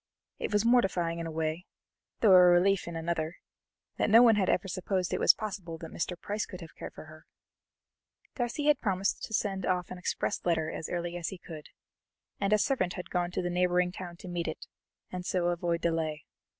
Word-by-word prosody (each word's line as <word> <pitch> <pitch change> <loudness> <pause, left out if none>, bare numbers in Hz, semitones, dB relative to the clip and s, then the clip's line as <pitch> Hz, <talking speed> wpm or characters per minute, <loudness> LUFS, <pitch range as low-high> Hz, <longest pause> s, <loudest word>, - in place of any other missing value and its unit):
It - - -3
was 210 +1 +2
mortifying 190 -8 +2
in 165 - -3
a - - -5
way, 160 +2 -2 0.5
though 215 - +6
a 180 - +9
relief 180 +2 +4
in 170 - -5
another, 165 0 -2 0.6
that - - +2
no 230 +3 +8
one 230 -2 +6
ever 195 -1 +1
supposed 185 0 -2
it - - 0
was - - +7
possible 190 -6 -5
that 165 0 -9
Mr. 175 +1 -3
Price 210 +1 -3
could 185 - -9
have 165 -3 -11
cared - - -9
for - - -10
her! 155 0 -15 1.1
Darcy 245 +4 -2
had 295 -2 +4
promised 195 -2 0
to - - -11
send 195 -2 -1
off 180 -1 -1
an 185 - -6
express 185 - -2
letter 160 -2 0
as 160 - -5
early 175 0 -3
as 170 -1 -4
he 190 - -5
could, 160 -3 -10 0.7
and 200 0 0
a 215 - +6
servant 205 -6 0
had 180 - -7
gone 175 -1 0
to 180 - -3
the 175 - -1
neighbouring 180 0 +2
town 175 -2 -8
to 185 - -11
meet 175 -1 -3
it, 160 - -5 0.5
and 180 -1 -4
so 180 -1 0
avoid 170 -1 -1
delay. 160 -3 -1
180 Hz, 205 wpm, -30 LUFS, 170-195 Hz, 1.1 s, a